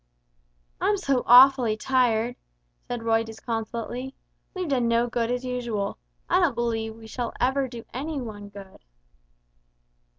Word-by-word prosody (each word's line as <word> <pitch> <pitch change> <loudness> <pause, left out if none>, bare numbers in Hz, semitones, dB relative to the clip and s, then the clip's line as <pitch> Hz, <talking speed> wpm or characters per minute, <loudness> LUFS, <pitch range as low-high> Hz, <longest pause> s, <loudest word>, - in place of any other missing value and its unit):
"I'm 410 0 +2
so 275 -9 +1
awfully 250 -3 +7
tired," 245 -1 +1 0.5
said 240 -2 -4
Roy, 225 0 +2
disconsolately; 230 +3 -5 0.4
"we've 365 -2 -3
done 255 -5 +1
no 235 +1 +3
good 235 -1 -1
as 250 +1 -2
usual. 235 -5 -3 0.3
I 360 - +3
don't 335 -9 +2
believe 225 -1 -1
we 225 - -15
ever - - -10
shall 255 +3 -1
do 235 -1 -9
any 290 +4 -3
one 220 -5 -6
any 205 0 -10
good!" 200 -1 -12
240 Hz, 140 wpm, -25 LUFS, 225-260 Hz, 0.5 s, awfully